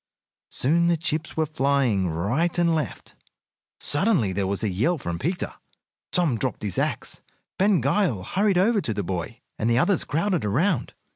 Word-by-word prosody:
Soon 170 Hz, +6 st, +2 dB
the 170 Hz, -1 st, +3 dB
chips 160 Hz, -1 st, -2 dB
were 160 Hz, -, +2 dB
flying 135 Hz, -, +1 dB
right 120 Hz, -, 0 dB
and 170 Hz, -1 st, +3 dB
left. 150 Hz, -, -3 dB, 0.7 s
Suddenly 145 Hz, -, +1 dB
there 95 Hz, 0 st, 0 dB
was 100 Hz, +2 st, -2 dB
a 110 Hz, -, +1 dB
yell 115 Hz, -, +1 dB
from 85 Hz, -, -4 dB
Peter. 175 Hz, +4 st, -2 dB, 0.6 s
Tom 160 Hz, -, +1 dB
dropped 130 Hz, -2 st, -2 dB
his 100 Hz, -4 st, -2 dB
axe. -, -, -2 dB, 0.4 s
Ben 195 Hz, -4 st, +4 dB
Gile 140 Hz, -, +1 dB
hurried 195 Hz, -, +1 dB
over 205 Hz, +3 st, +3 dB
to 110 Hz, -, -3 dB
the 100 Hz, -, -1 dB
boy, 95 Hz, +7 st, -4 dB, 0.2 s
and 110 Hz, -, +1 dB
the 120 Hz, -, +3 dB
others 185 Hz, +7 st, +3 dB
crowded 170 Hz, +3 st, 0 dB
around. 140 Hz, -, 0 dB
145 Hz, 165 wpm, -25 LUFS, 105-175 Hz, 0.7 s, Ben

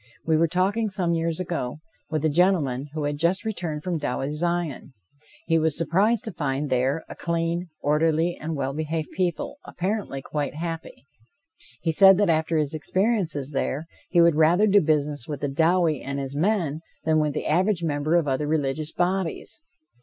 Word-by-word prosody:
We 160 Hz, -, +3 dB
were 165 Hz, +1 st, +3 dB
talking 195 Hz, +6 st, +1 dB
some 180 Hz, -3 st, -1 dB
years 165 Hz, 0 st, -1 dB
ago 165 Hz, -8 st, -3 dB, 0.3 s
with 155 Hz, -1 st, -1 dB
a -, -, +4 dB
gentleman 150 Hz, -5 st, +2 dB
who 155 Hz, -, -2 dB
had 145 Hz, 0 st, -2 dB
just 170 Hz, +6 st, +1 dB
returned 170 Hz, -8 st, -3 dB
from 175 Hz, -3 st, -2 dB
Dowie's 145 Hz, +1 st, -2 dB
Zion. 170 Hz, -6 st, -2 dB, 0.5 s
He 165 Hz, -, +3 dB
was 160 Hz, -1 st, +1 dB
surprised 205 Hz, +8 st, +2 dB
to 220 Hz, -, -3 dB
find 140 Hz, -2 st, -2 dB
there 130 Hz, +5 st, +1 dB
a -, -, -9 dB
clean, 170 Hz, +1 st, -1 dB, 0.2 s
orderly 160 Hz, +3 st, +2 dB
and 160 Hz, +1 st, -5 dB
well 135 Hz, -1 st, -2 dB
behaved 155 Hz, +1 st, -3 dB
people, 180 Hz, -, -2 dB
apparently 185 Hz, -7 st, -3 dB
quite 145 Hz, -1 st, -3 dB
happy. 165 Hz, -3 st, -6 dB, 0.8 s
He 165 Hz, -, +1 dB
said 195 Hz, +3 st, +7 dB
that 205 Hz, -4 st, +3 dB
after 160 Hz, +1 st, +1 dB
his 150 Hz, -1 st, 0 dB
experiences 165 Hz, -, -1 dB
there, 140 Hz, +2 st, -2 dB, 0.2 s
he 175 Hz, -, +3 dB
would 170 Hz, -1 st, +6 dB
rather 165 Hz, +6 st, +4 dB
do 205 Hz, -1 st, +5 dB
business 150 Hz, -4 st, 0 dB
with 145 Hz, -3 st, -5 dB
Dowie 165 Hz, -1 st, +2 dB
and 140 Hz, +1 st, -4 dB
his 135 Hz, 0 st, -4 dB
men 165 Hz, -3 st, 0 dB, 0.2 s
than 155 Hz, 0 st, +3 dB
with 150 Hz, -2 st, 0 dB
the -, -, -3 dB
average 180 Hz, +3 st, +1 dB
member 150 Hz, +1 st, 0 dB
of 170 Hz, -4 st, +2 dB
other 140 Hz, +2 st, 0 dB
religious 150 Hz, 0 st, -1 dB
bodies. 175 Hz, -2 st, -2 dB
160 Hz, 175 wpm, -25 LUFS, 150-175 Hz, 0.8 s, said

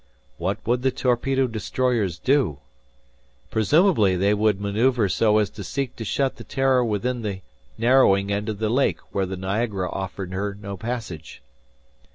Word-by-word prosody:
What 95 Hz, +4 st, -1 dB
would 120 Hz, +2 st, +1 dB
the 130 Hz, -, +2 dB
torpedo 130 Hz, +1 st, +1 dB
destroyers 115 Hz, -4 st, -1 dB
do? 130 Hz, -, +1 dB, 0.9 s
Presumably, 110 Hz, -, +3 dB
they 100 Hz, +3 st, +2 dB
would 105 Hz, -1 st, +2 dB
maneuver 110 Hz, +3 st, +1 dB
so 105 Hz, +2 st, +3 dB
as 105 Hz, -1 st, +2 dB
to 100 Hz, -, -8 dB
seek 130 Hz, +7 st, -3 dB
to 115 Hz, -, -5 dB
shut 135 Hz, +5 st, -1 dB
the -, -, -9 dB
"Terror" 135 Hz, -2 st, +2 dB
within 120 Hz, +3 st, -1 dB
the 100 Hz, -3 st, -4 dB, 0.4 s
narrowing 110 Hz, -5 st, +4 dB
end 105 Hz, +2 st, -1 dB
of 105 Hz, -, -3 dB
the 110 Hz, +1 st, -1 dB
lake 135 Hz, +4 st, +2 dB, 0.2 s
where 95 Hz, -1 st, 0 dB
the 95 Hz, 0 st, -5 dB
Niagara 95 Hz, 0 st, -2 dB
offered 95 Hz, -1 st, -5 dB
her 100 Hz, +1 st, -3 dB
no 100 Hz, -1 st, -6 dB
passage. 110 Hz, -, -6 dB
110 Hz, 160 wpm, -23 LUFS, 100-125 Hz, 0.9 s, narrowing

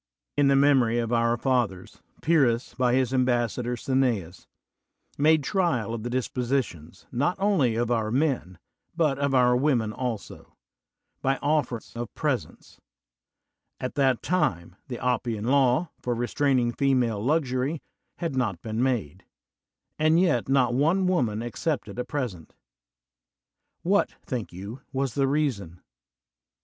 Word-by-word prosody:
In 145 Hz, -1 st, +3 dB
the 140 Hz, -, +4 dB
memory 135 Hz, -4 st, +4 dB
of 120 Hz, 0 st, -1 dB
our 115 Hz, 0 st, +2 dB
fathers, 120 Hz, -8 st, -1 dB, 0.2 s
Pyrrhus, 135 Hz, -7 st, +2 dB
by 125 Hz, -1 st, +2 dB
his 130 Hz, 0 st, +1 dB
ambassador 125 Hz, -1 st, 0 dB
Cineas, 120 Hz, -9 st, -1 dB, 0.7 s
made 155 Hz, +1 st, +4 dB
trial 135 Hz, -, 0 dB
of 115 Hz, -, -4 dB
the 120 Hz, -, -4 dB
dis 125 Hz, 0 st, -1 dB
positions, 120 Hz, -, -3 dB
not 145 Hz, +9 st, 0 dB
only 190 Hz, -, +2 dB
of 120 Hz, +1 st, 0 dB
our 110 Hz, -2 st, +1 dB
men, 125 Hz, -, 0 dB, 0.4 s
but 150 Hz, -5 st, +1 dB
of 140 Hz, -1 st, +1 dB
our 125 Hz, -1 st, +4 dB
women 125 Hz, -5 st, +1 dB
also, 120 Hz, -4 st, -6 dB, 0.7 s
by 135 Hz, +1 st, +2 dB
oflfers 140 Hz, -7 st, -1 dB
of 120 Hz, -1 st, -5 dB
presents: -, -, -3 dB, 1.0 s
at 130 Hz, -, -4 dB
that 135 Hz, -4 st, +1 dB
time 120 Hz, -, 0 dB
the 125 Hz, -3 st, -5 dB
Oppian 115 Hz, -3 st, -1 dB
Law, 135 Hz, +4 st, +3 dB
for 120 Hz, -1 st, -2 dB
restraining 120 Hz, +1 st, +1 dB
female 120 Hz, -5 st, +1 dB
luxury, 140 Hz, +1 st, 0 dB, 0.3 s
had 165 Hz, -5 st, -3 dB
not 110 Hz, -9 st, -1 dB
been 110 Hz, +1 st, -2 dB
made; 105 Hz, -, -1 dB, 0.8 s
and 155 Hz, +2 st, +4 dB
yet 150 Hz, -10 st, +2 dB
not 130 Hz, -3 st, +3 dB
one 165 Hz, +9 st, +2 dB
woman 120 Hz, -, 0 dB
accepted 120 Hz, -2 st, -3 dB
a -, -, 0 dB
present. 120 Hz, -, -5 dB, 1.3 s
What, 200 Hz, +4 st, +2 dB
think 120 Hz, -5 st, -4 dB
you, 100 Hz, +8 st, -8 dB
was 135 Hz, -2 st, -1 dB
the 135 Hz, +1 st, +1 dB
reason? 125 Hz, -, -1 dB
125 Hz, 135 wpm, -26 LUFS, 115-140 Hz, 1.3 s, the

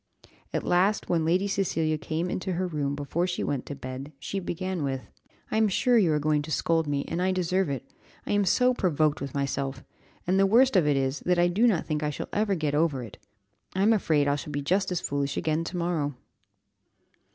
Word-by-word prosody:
At -, -, -2 dB
last, 190 Hz, +4 st, +2 dB
when 170 Hz, -2 st, +2 dB
Lady 180 Hz, +5 st, +2 dB
Cecilia 165 Hz, -5 st, 0 dB
came 160 Hz, +3 st, -2 dB
into 185 Hz, +1 st, -3 dB
her 185 Hz, +2 st, -1 dB
room 145 Hz, -5 st, -2 dB
before 150 Hz, +5 st, -1 dB
she 180 Hz, -, -2 dB
went 135 Hz, -3 st, -2 dB
to 145 Hz, -, -5 dB
bed, 130 Hz, +2 st, -7 dB
she 195 Hz, +8 st, -4 dB
began 185 Hz, 0 st, -3 dB
with 135 Hz, -2 st, -2 dB, 0.5 s
"I -, -, +1 dB
am 220 Hz, -1 st, +4 dB
sure 245 Hz, +5 st, +2 dB
you 195 Hz, -8 st, +4 dB
are 150 Hz, -, +2 dB
going 150 Hz, 0 st, +1 dB
to 150 Hz, -, -8 dB
scold 165 Hz, 0 st, +1 dB
me, 140 Hz, -1 st, -1 dB
and 170 Hz, +2 st, -2 dB
I 185 Hz, +1 st, +2 dB
deserve 185 Hz, -1 st, 0 dB
it, 135 Hz, -4 st, -4 dB, 0.4 s
I -, -, -3 dB
am 205 Hz, 0 st, +3 dB
so 250 Hz, +7 st, +3 dB
provoked 155 Hz, -, +1 dB
with 140 Hz, +1 st, -5 dB
myself, 135 Hz, -1 st, -2 dB, 0.4 s
and 185 Hz, +2 st, +2 dB
the 195 Hz, -, +5 dB
worst 245 Hz, +4 st, +4 dB
of 175 Hz, -5 st, +4 dB
it 145 Hz, -2 st, +3 dB
is, 135 Hz, +1 st, 0 dB
that 180 Hz, 0 st, +3 dB
I 175 Hz, 0 st, +4 dB
do 215 Hz, +7 st, +3 dB
not 195 Hz, -8 st, +1 dB
think 150 Hz, -1 st, -2 dB
I 150 Hz, -, 0 dB
shall 150 Hz, -, -5 dB
ever 205 Hz, -1 st, +1 dB
get 155 Hz, -4 st, -1 dB
over 145 Hz, -4 st, +1 dB
it 110 Hz, -, -11 dB, 0.6 s
I 190 Hz, -, +2 dB
am 220 Hz, +2 st, +5 dB
afraid 155 Hz, -8 st, +2 dB
I 140 Hz, 0 st, +2 dB
shall 145 Hz, -, -7 dB
be 145 Hz, -1 st, -3 dB
just 190 Hz, +6 st, +1 dB
as 180 Hz, -, -1 dB
foolish 140 Hz, -1 st, -2 dB
again 160 Hz, 0 st, 0 dB
tomorrow." 170 Hz, -5 st, -2 dB
165 Hz, 220 wpm, -27 LUFS, 145-185 Hz, 0.6 s, the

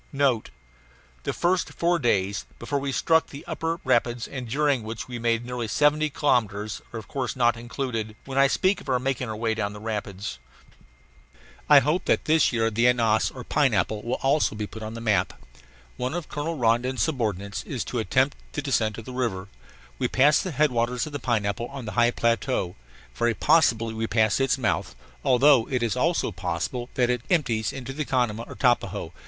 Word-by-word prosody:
NOTE: 135 Hz, -5 st, +1 dB, 0.8 s
The -, -, 0 dB
first 180 Hz, +1 st, 0 dB
four 170 Hz, 0 st, +1 dB
days, 100 Hz, -5 st, 0 dB
before 140 Hz, +4 st, -2 dB
we 140 Hz, 0 st, -2 dB
struck 160 Hz, +4 st, +2 dB
the 140 Hz, -, -10 dB
upper 165 Hz, +1 st, -3 dB
rapids, 120 Hz, -2 st, +1 dB
and 130 Hz, -4 st, -6 dB
during 140 Hz, 0 st, +1 dB
which 110 Hz, 0 st, -6 dB
we 120 Hz, -1 st, -6 dB
made 115 Hz, 0 st, 0 dB
nearly 125 Hz, -2 st, -3 dB
seventy 150 Hz, +5 st, +2 dB
kilometres, 110 Hz, -8 st, 0 dB
are 120 Hz, -, -6 dB
of 110 Hz, -, -8 dB
course 135 Hz, -2 st, -3 dB
not 120 Hz, -2 st, +3 dB
included 115 Hz, -2 st, -4 dB
when 135 Hz, -, -6 dB
I 140 Hz, -, +6 dB
speak 185 Hz, +7 st, +1 dB
of -, -, -10 dB
our 130 Hz, -, +3 dB
making 125 Hz, -1 st, -2 dB
our 110 Hz, -, -3 dB
way 110 Hz, +1 st, 0 dB
down 105 Hz, -2 st, -2 dB
the 105 Hz, -, -9 dB
rapids. 105 Hz, -, -5 dB, 1.3 s
I 145 Hz, -2 st, +9 dB
hope 160 Hz, +6 st, 0 dB
that -, -, +1 dB
this 155 Hz, -1 st, +4 dB
year 115 Hz, -2 st, +1 dB
the 115 Hz, +3 st, +3 dB
Ananas, 115 Hz, -3 st, +3 dB
or 125 Hz, -, -9 dB
Pineapple, 115 Hz, -7 st, +1 dB
will 120 Hz, +3 st, -2 dB
also 135 Hz, -3 st, +2 dB
be 105 Hz, 0 st, -3 dB
put 110 Hz, +2 st, -10 dB
on 110 Hz, +1 st, -6 dB
the 115 Hz, -, -6 dB
map. 105 Hz, -5 st, 0 dB, 0.6 s
One 125 Hz, +5 st, -2 dB
of 175 Hz, -3 st, -5 dB
Colonel 155 Hz, +2 st, -3 dB
Rondon's 120 Hz, +2 st, +1 dB
subordinates 105 Hz, -, -2 dB
is 125 Hz, -8 st, -3 dB
to 120 Hz, -, -3 dB
attempt 130 Hz, +5 st, +1 dB, 0.2 s
the 145 Hz, -, -3 dB
descent 115 Hz, -6 st, 0 dB
of 115 Hz, -, -8 dB
the 130 Hz, -, -8 dB
river. 105 Hz, -7 st, -2 dB, 0.5 s
We -, -, +1 dB
passed 140 Hz, +3 st, +4 dB
the 185 Hz, -, -3 dB
headwaters 125 Hz, -5 st, +1 dB
of 155 Hz, -, -9 dB
the 145 Hz, -, -3 dB
Pineapple 115 Hz, -2 st, -1 dB
on 135 Hz, -2 st, -8 dB
the 110 Hz, -, -5 dB
high 120 Hz, 0 st, +3 dB
plateau, 115 Hz, -5 st, 0 dB, 0.4 s
very 120 Hz, -1 st, 0 dB
possibly 115 Hz, -8 st, +3 dB
we 110 Hz, 0 st, -2 dB
passed 110 Hz, +2 st, +2 dB
its 135 Hz, 0 st, +2 dB
mouth, 115 Hz, -6 st, -1 dB, 0.3 s
although 130 Hz, -1 st, +5 dB
it 125 Hz, -3 st, 0 dB
is 115 Hz, -1 st, 0 dB
also 165 Hz, +7 st, +1 dB
possible 90 Hz, +8 st, -3 dB
that 125 Hz, -1 st, +2 dB
it 125 Hz, -2 st, -1 dB
empties 120 Hz, -, +1 dB
into 135 Hz, 0 st, -6 dB
the 150 Hz, +2 st, -2 dB
Canama 120 Hz, -5 st, 0 dB
or -, -, -9 dB
Tapajos. 100 Hz, -9 st, 0 dB
120 Hz, 195 wpm, -25 LUFS, 110-140 Hz, 1.3 s, I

